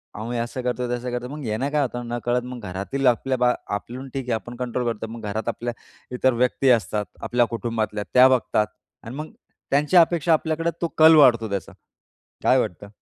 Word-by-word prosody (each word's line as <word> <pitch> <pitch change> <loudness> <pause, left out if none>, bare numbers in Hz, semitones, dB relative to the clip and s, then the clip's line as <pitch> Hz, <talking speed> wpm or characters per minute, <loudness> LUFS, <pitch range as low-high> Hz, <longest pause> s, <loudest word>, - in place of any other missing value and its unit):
आम्ही 115 +3 -4
असं 120 +2 -3
करतोय, 125 0 -1
तसं 125 0 -5
करतोय. 125 +1 -4
मग 150 -3 -7
याने 110 +5 -1
काय 150 -1 +2
होतं 120 -2 -3
नकळत 120 +1 -1
मग 125 0 -7
घरातील 115 +9 -2
आपल्या 130 +2 +2
बा, 125 0 +3 0.2
आपण 125 +6 -7
ठीक 135 -1 -3
आहे - - +1
आपण 120 +3 -7
कंट्रोल 125 0 -2
करतो, 110 +1 -7
मग 115 - -8
घरात 110 +2 -4
आपल्या 120 0 -4 0.4
इतर 130 +1 +2
व्यक्ती 125 +2 +1
असतात, 105 -3 +2 0.2
आपल्या 120 0 +2
कुटुंबातल्या 110 -2 -2
त्या 125 +1 +8
बघतात 110 -4 +1 0.4
आणि 115 +3 -8
मग 155 +2 -6 0.4
त्यांच्या 150 +6 +5
अपेक्षा 165 -1 +2
आपल्याकडे 160 +1 0
तो 170 - +1
कल 160 +1 +8
वाढतो 115 -7 +5
त्याचा. 100 -1 -4 0.7
काय - - +5
वाटतं? 100 +4 -3
125 Hz, 190 wpm, -23 LUFS, 115-135 Hz, 0.7 s, त्या